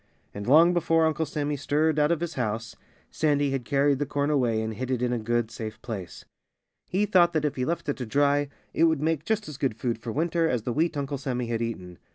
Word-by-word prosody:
And 100 Hz, +1 st, -6 dB
long 165 Hz, +6 st, +6 dB
before 165 Hz, -1 st, +3 dB
Uncle 160 Hz, 0 st, 0 dB
Sammy 145 Hz, 0 st, -2 dB
stirred 150 Hz, +2 st, +1 dB
out 150 Hz, +2 st, +3 dB
of 170 Hz, -1 st, 0 dB
his 170 Hz, -1 st, -3 dB
house 115 Hz, -2 st, -3 dB, 0.4 s
Sandy 145 Hz, -2 st, +1 dB
had 135 Hz, -3 st, -2 dB
carried 140 Hz, 0 st, +2 dB
the 145 Hz, -, -1 dB
corn 145 Hz, +2 st, 0 dB
away 120 Hz, -6 st, +2 dB
and 110 Hz, 0 st, -3 dB
hid 125 Hz, +4 st, -5 dB
it 130 Hz, -2 st, 0 dB
in 125 Hz, 0 st, 0 dB
a 120 Hz, -, -1 dB
good, 115 Hz, 0 st, -1 dB
safe 110 Hz, -1 st, -6 dB
place. 105 Hz, -7 st, -7 dB, 0.6 s
He 195 Hz, +3 st, +1 dB
thought 175 Hz, -3 st, +4 dB
that 155 Hz, -2 st, +1 dB
if 150 Hz, -, -1 dB
he 125 Hz, -, -1 dB
left 170 Hz, +3 st, -2 dB
it 145 Hz, -, -1 dB
to 125 Hz, -, -4 dB
dry 145 Hz, +3 st, +2 dB, 0.2 s
it 165 Hz, -, +4 dB
would 160 Hz, -3 st, +1 dB
make 160 Hz, -1 st, 0 dB
just 220 Hz, -1 st, -1 dB
as 150 Hz, -3 st, -7 dB
good 135 Hz, -6 st, -1 dB
food 120 Hz, -2 st, -2 dB
for 115 Hz, 0 st, -5 dB
winter 165 Hz, +3 st, +1 dB
as 120 Hz, -4 st, -1 dB
the 120 Hz, -, -2 dB
wheat 160 Hz, +2 st, 0 dB
Uncle 140 Hz, -1 st, -3 dB
Sammy 125 Hz, -2 st, -2 dB
had 115 Hz, -1 st, -1 dB
eaten. 90 Hz, -7 st, -5 dB
140 Hz, 240 wpm, -26 LUFS, 120-160 Hz, 0.6 s, long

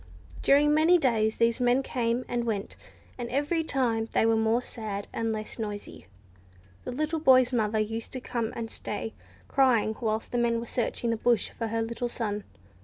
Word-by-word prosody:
During 295 Hz, +2 st, +5 dB
many 320 Hz, +4 st, +5 dB
days, 225 Hz, -7 st, +1 dB
these 230 Hz, +1 st, +2 dB
men 250 Hz, +2 st, +3 dB
came 240 Hz, -1 st, -1 dB
and 240 Hz, -1 st, -1 dB
went, 210 Hz, -4 st, -3 dB, 0.4 s
and 240 Hz, -1 st, -4 dB
every 290 Hz, +6 st, 0 dB
time 235 Hz, -7 st, 0 dB
they -, -, +3 dB
were 225 Hz, 0 st, +4 dB
more 220 Hz, +2 st, +2 dB
sad, 210 Hz, -5 st, -5 dB
and 225 Hz, 0 st, -1 dB
less 215 Hz, +1 st, -5 dB
noisy. 205 Hz, -, -6 dB, 0.8 s
The -, -, -3 dB
little 310 Hz, +5 st, -1 dB
boy's 255 Hz, -4 st, +5 dB
mother 220 Hz, -2 st, +1 dB
used 225 Hz, +1 st, -2 dB
to 260 Hz, -, -3 dB
come 235 Hz, -3 st, -3 dB
and 230 Hz, -1 st, -5 dB
stay, 220 Hz, +1 st, -4 dB, 0.3 s
crying, 240 Hz, -6 st, +3 dB
whilst 220 Hz, -1 st, -1 dB
the 245 Hz, -, 0 dB
men 235 Hz, -1 st, +2 dB
were 230 Hz, -, -5 dB
searching 235 Hz, 0 st, -1 dB
the 230 Hz, -, 0 dB
bush 235 Hz, +1 st, +1 dB
for 230 Hz, -, -4 dB
her 225 Hz, +1 st, -1 dB
little 235 Hz, +1 st, -3 dB
son. 210 Hz, -4 st, -3 dB
235 Hz, 180 wpm, -28 LUFS, 220-255 Hz, 0.8 s, During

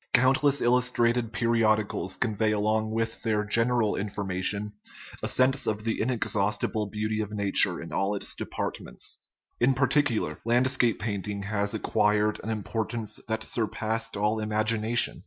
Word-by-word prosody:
Countless 135 Hz, +3 st, +3 dB
illustrated 120 Hz, -1 st, +2 dB
periodicals 115 Hz, -3 st, +1 dB
convey 110 Hz, 0 st, 0 dB
along 110 Hz, +1 st, 0 dB
with 115 Hz, +1 st, -2 dB
their 105 Hz, -2 st, 0 dB
general 115 Hz, 0 st, +1 dB
information 100 Hz, 0 st, -2 dB, 0.5 s
a -, -, -2 dB
sense 130 Hz, +1 st, +2 dB
of 105 Hz, 0 st, -1 dB
the 115 Hz, 0 st, -2 dB
inexhaust 105 Hz, -4 st, 0 dB
ible 105 Hz, -2 st, -3 dB
beauty 110 Hz, 0 st, -2 dB
of 105 Hz, -1 st, -5 dB
nature 100 Hz, -2 st, +3 dB
in -, -, -8 dB
all 100 Hz, +1 st, 0 dB
its 100 Hz, -, -1 dB
departments. -, -, -4 dB, 0.4 s
In 130 Hz, +2 st, +3 dB
par 140 Hz, +1 st, +2 dB
ticular, 145 Hz, -7 st, 0 dB
landscape 120 Hz, 0 st, +2 dB
painting 100 Hz, 0 st, -4 dB
has 100 Hz, +1 st, -1 dB
acquired 105 Hz, 0 st, +1 dB
an 110 Hz, -, -5 dB
importance 110 Hz, +1 st, -2 dB
that 110 Hz, 0 st, -2 dB
surpassed 110 Hz, -1 st, -1 dB
all 105 Hz, +2 st, 0 dB
imagination. 110 Hz, +2 st, +2 dB
110 Hz, 140 wpm, -27 LUFS, 105-120 Hz, 0.5 s, Countless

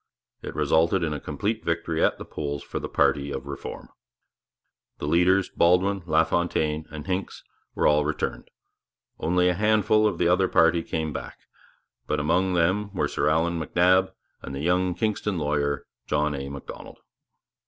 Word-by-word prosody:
It -, -, -7 dB
resulted 85 Hz, +3 st, +2 dB
in 80 Hz, -2 st, -1 dB
a 75 Hz, -, -4 dB
complete 100 Hz, +12 st, -3 dB
victory 85 Hz, -1 st, -1 dB
at -, -, +2 dB
the -, -, -8 dB
polls 70 Hz, -1 st, -5 dB
for -, -, -5 dB
the -, -, -6 dB
party 70 Hz, 0 st, +1 dB
of 65 Hz, -1 st, -5 dB
Reform. 70 Hz, -1 st, -7 dB, 1.1 s
The -, -, -5 dB
leaders, 90 Hz, +5 st, +3 dB
Baldwin, 95 Hz, +3 st, +2 dB
LaFontaine, 80 Hz, -1 st, +1 dB
and 75 Hz, -1 st, -8 dB
Hincks, 95 Hz, +1 st, -4 dB, 0.3 s
were -, -, 0 dB
all 75 Hz, 0 st, +4 dB
returned. 75 Hz, +1 st, -3 dB, 0.7 s
Only 90 Hz, +2 st, +2 dB
a 90 Hz, -, +3 dB
handful 110 Hz, +2 st, +3 dB
of 100 Hz, -5 st, -2 dB
the -, -, +2 dB
other 90 Hz, +2 st, +3 dB
party 85 Hz, 0 st, +3 dB
came 80 Hz, -2 st, -3 dB
back; -, -, -7 dB, 0.7 s
but 75 Hz, -, 0 dB
among 90 Hz, +5 st, +1 dB
them 95 Hz, +4 st, +1 dB
were -, -, +1 dB
Sir -, -, 0 dB
Allan 85 Hz, +2 st, +1 dB
MacNab 90 Hz, +4 st, +3 dB, 0.3 s
and 70 Hz, -, -7 dB
the 70 Hz, -, -4 dB
young 90 Hz, +2 st, +1 dB
Kingston 105 Hz, -3 st, -1 dB
lawyer, 75 Hz, -2 st, -1 dB, 0.2 s
John 75 Hz, 0 st, +1 dB
A. 70 Hz, -1 st, -5 dB
Macdonald. 70 Hz, -1 st, -9 dB
85 Hz, 160 wpm, -25 LUFS, 75-95 Hz, 1.1 s, all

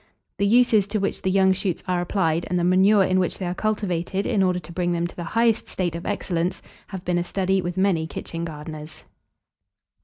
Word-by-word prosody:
The 200 Hz, -, +3 dB
uses 220 Hz, -3 st, +4 dB
to 210 Hz, +1 st, -1 dB
which 200 Hz, -, -2 dB
the 190 Hz, -, 0 dB
young 190 Hz, 0 st, +4 dB
shoots 185 Hz, -2 st, -3 dB
are 180 Hz, -1 st, +1 dB
applied, 170 Hz, -3 st, 0 dB
and 180 Hz, -, 0 dB
the 175 Hz, -, +1 dB
manure 190 Hz, +3 st, +5 dB
in 185 Hz, 0 st, +2 dB
which 180 Hz, -, -1 dB
they 190 Hz, -, -4 dB
are 175 Hz, -, -1 dB
cultivated 195 Hz, -2 st, -1 dB
in 215 Hz, -5 st, +1 dB
order 180 Hz, -1 st, +2 dB
to 175 Hz, -, -8 dB
bring 175 Hz, 0 st, -1 dB
them 170 Hz, 0 st, 0 dB
to 175 Hz, -, -7 dB
the 175 Hz, -, -5 dB
highest 225 Hz, +5 st, +1 dB
state 175 Hz, -3 st, -2 dB
of 170 Hz, +1 st, -6 dB
excellence, 180 Hz, -3 st, -2 dB, 0.2 s
have 190 Hz, -2 st, -8 dB
been 175 Hz, -1 st, +1 dB
a -, -, 0 dB
study 190 Hz, +1 st, 0 dB
with 175 Hz, 0 st, -4 dB
many 185 Hz, -4 st, +2 dB
kitchen 165 Hz, +1 st, -6 dB
gardeners. 155 Hz, -1 st, -8 dB
185 Hz, 215 wpm, -23 LUFS, 175-195 Hz, 0.2 s, manure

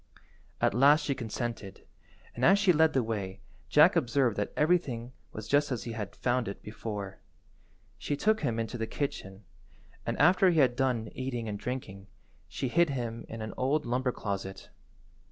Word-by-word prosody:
At -, -, +2 dB
last 145 Hz, +6 st, +5 dB
she 140 Hz, -, +1 dB
consented, 115 Hz, -4 st, -5 dB, 0.5 s
and 120 Hz, -, -5 dB
as 195 Hz, +9 st, +7 dB
she 195 Hz, -3 st, +4 dB
led 160 Hz, 0 st, +4 dB
the 130 Hz, -, +2 dB
way 100 Hz, -3 st, -4 dB, 0.3 s
Jack -, -, +6 dB
observed 120 Hz, -2 st, +2 dB
that 105 Hz, -, -1 dB
everything 140 Hz, -8 st, +1 dB, 0.2 s
was 110 Hz, 0 st, -7 dB
just 145 Hz, +3 st, +2 dB
as 125 Hz, -, -2 dB
he 120 Hz, -, -5 dB
had 105 Hz, -3 st, -5 dB
found 125 Hz, -1 st, 0 dB
it 100 Hz, -, -7 dB
before. 105 Hz, -3 st, -6 dB, 0.8 s
She 145 Hz, -, -2 dB
took 215 Hz, +7 st, +2 dB
him 120 Hz, -7 st, -1 dB
into 115 Hz, +1 st, -4 dB
the 115 Hz, -, -2 dB
kitchen, 100 Hz, -9 st, -4 dB, 0.6 s
and -, -, -3 dB
after 180 Hz, +4 st, +5 dB
he 170 Hz, -, +1 dB
had 125 Hz, -4 st, +4 dB
done 125 Hz, -5 st, 0 dB
eating 125 Hz, -3 st, -4 dB
and 105 Hz, -1 st, -4 dB
drinking, 100 Hz, -6 st, -6 dB, 0.4 s
she 130 Hz, -, -3 dB
hid 170 Hz, +5 st, +3 dB
him 120 Hz, -4 st, -4 dB
in 115 Hz, -1 st, -6 dB
an 110 Hz, -, -6 dB
old 145 Hz, +4 st, +1 dB
lumber 125 Hz, +2 st, 0 dB
closet. 100 Hz, -4 st, -5 dB
120 Hz, 170 wpm, -29 LUFS, 110-140 Hz, 0.8 s, as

